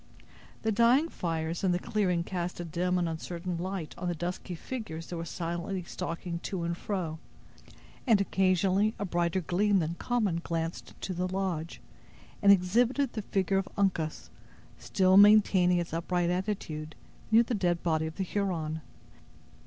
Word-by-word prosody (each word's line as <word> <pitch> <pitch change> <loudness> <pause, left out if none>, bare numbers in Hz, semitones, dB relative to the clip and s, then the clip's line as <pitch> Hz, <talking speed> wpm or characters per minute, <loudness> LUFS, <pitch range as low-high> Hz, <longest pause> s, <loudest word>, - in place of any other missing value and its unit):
The 220 - +1
dying 240 +9 +4
fires 165 - -3
in 185 -2 +3
the - - +2
clearing 180 -3 0
cast 180 -1 -4
a 175 - -4
dim 180 +3 0
and 175 -1 +1
uncertain 170 +2 -4
light 185 -3 -4
on 180 - -3
the 175 - -1
dusky 175 +2 -4
figures 165 -6 -6
that 175 - -6
were 165 0 -4
silently 170 +2 -3
stalking 170 0 -4
to 175 0 -4
and 170 0 -1
fro; 170 -5 -3 0.9
and 220 -4 +5
occasionally 195 +2 +2
a 200 - -2
brighter 175 0 0
gleam 195 +4 +2
than 165 -2 0
common 205 -4 0
glanced 165 0 -3
into 190 - -5
the 180 +1 -1
lodge, 185 -4 -3 0.6
and 200 -1 +7
exhibited 235 +8 +3
the 215 - -3
figure 195 -1 +1
of 190 0 -4
Uncas 175 -6 -1 0.5
still 190 0 +3
maintaining 200 -3 +6
its 175 -2 -3
upright 175 +1 0
attitude 180 -5 -3 0.3
near 225 +1 +6
the 240 - -3
dead 175 -5 0
body 160 -2 +1
of 160 - -7
the 195 - -1
Huron. 170 -5 -2
180 Hz, 160 wpm, -29 LUFS, 170-195 Hz, 0.9 s, and